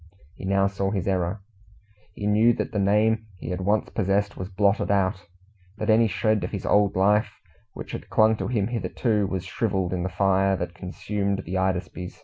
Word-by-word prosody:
He -, -, -9 dB
now 100 Hz, 0 st, +2 dB
saw 100 Hz, 0 st, -1 dB
his 100 Hz, -2 st, -2 dB
error. 95 Hz, +1 st, -1 dB, 0.7 s
He 100 Hz, -, -5 dB
knew 110 Hz, +3 st, +4 dB
that -, -, -3 dB
the 105 Hz, -, -1 dB
name 110 Hz, +3 st, +2 dB
he 85 Hz, -, -6 dB
had 90 Hz, +1 st, -3 dB
once 105 Hz, +3 st, +1 dB
possessed 100 Hz, 0 st, 0 dB
was 95 Hz, 0 st, -6 dB
blotted 100 Hz, +1 st, +1 dB
out, 95 Hz, -2 st, 0 dB, 0.5 s
that 110 Hz, -, +1 dB
any 115 Hz, +1 st, +5 dB
shred 110 Hz, +2 st, 0 dB
of -, -, -2 dB
his 100 Hz, -3 st, -5 dB
old 105 Hz, -1 st, +3 dB
life 105 Hz, +3 st, +2 dB, 0.4 s
which -, -, -8 dB
had -, -, -7 dB
clung 110 Hz, 0 st, +4 dB
to -, -, -3 dB
him 110 Hz, -4 st, 0 dB
hitherto, 115 Hz, -3 st, 0 dB
was 95 Hz, -2 st, -3 dB
shrivelled 95 Hz, -2 st, -1 dB
in 90 Hz, -, -1 dB
the 95 Hz, -, -2 dB
fire 95 Hz, +1 st, +2 dB
that 90 Hz, 0 st, -4 dB
consumed 100 Hz, +2 st, -3 dB
the 90 Hz, -, -6 dB
"Hydaspes". 95 Hz, -1 st, -2 dB
100 Hz, 190 wpm, -25 LUFS, 95-105 Hz, 0.7 s, any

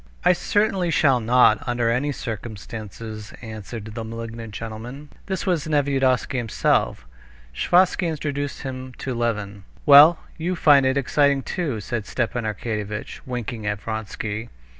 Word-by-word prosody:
"I 180 Hz, -, +7 dB
certainly 195 Hz, -1 st, +1 dB
shall 140 Hz, -6 st, +3 dB
not, 115 Hz, -1 st, +5 dB
under 120 Hz, -1 st, +1 dB
any 135 Hz, +5 st, 0 dB
circumstances," 110 Hz, -2 st, -7 dB
answered 110 Hz, 0 st, -7 dB
the 110 Hz, +1 st, -6 dB
malignant 115 Hz, 0 st, -7 dB
gentleman. 115 Hz, +7 st, -7 dB, 0.2 s
This 190 Hz, -3 st, -2 dB
was 175 Hz, -6 st, 0 dB
Nevyedovsky 135 Hz, -3 st, +1 dB
himself. 110 Hz, -, 0 dB, 0.5 s
Sviazhsky 180 Hz, -, +3 dB
introduced 145 Hz, -3 st, -3 dB
him 130 Hz, -1 st, -6 dB
to 130 Hz, -, -4 dB
Levin. 105 Hz, -4 st, -2 dB, 0.2 s
"Well, 150 Hz, +3 st, +9 dB, 0.2 s
you 175 Hz, +3 st, -1 dB
find 145 Hz, -5 st, +5 dB
it 130 Hz, +1 st, +1 dB
exciting 140 Hz, 0 st, +2 dB
too?" 150 Hz, -, -2 dB
said 110 Hz, -1 st, -4 dB
Stepan 120 Hz, -2 st, -2 dB
Arkadyevitch, 105 Hz, -1 st, -4 dB
winking 120 Hz, -3 st, -4 dB
at 105 Hz, -1 st, -1 dB
Vronsky. 110 Hz, +1 st, -4 dB
120 Hz, 130 wpm, -23 LUFS, 110-145 Hz, 0.5 s, Well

